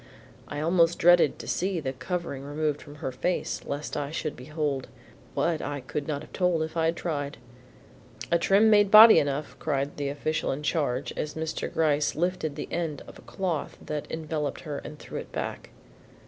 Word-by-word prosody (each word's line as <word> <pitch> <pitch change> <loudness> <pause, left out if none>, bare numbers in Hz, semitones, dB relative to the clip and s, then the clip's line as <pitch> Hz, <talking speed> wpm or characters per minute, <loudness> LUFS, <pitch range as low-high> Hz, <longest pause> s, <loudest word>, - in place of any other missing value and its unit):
I 145 - -4
almost 165 +1 +3
dreaded 175 0 +5
to - - -9
see 185 -1 0
the 135 -4 -3
covering 170 -2 -4
removed 150 +1 -2
from 145 0 -12
her 130 - -1
face 175 +7 -2
lest 145 +1 -4
I 140 - -2
should 155 -1 -3
behold, 145 0 -3 0.5
what? 165 -2 +1
I 145 0 -3
could 140 +2 -5
not 150 -1 -2
have - - -15
told 180 -4 +2
if 160 +1 -6
I 165 -1 +2
had 165 +1 +1
tried. 145 -5 -3 0.9
"A 170 - +4
trim 205 +5 +5
made 205 -1 +5
body 220 +2 +10
enough," 145 +1 -2
cried 140 -2 -1
the 140 -1 -1
official 155 +2 -1
in 145 +3 -4
charge 140 -5 0
as 150 - -3
Mr. 160 0 -3
Gryce 150 -2 +1
lifted 165 -2 -1
an - - -3
end 165 -4 -2
of - - -10
the - - -14
cloth 175 -6 -3
that 150 -1 -5
enveloped 155 -2 -3
her 150 -4 -5
and 150 0 -9
threw - - -7
it - - -9
back. - - -5
155 Hz, 190 wpm, -27 LUFS, 145-170 Hz, 0.9 s, body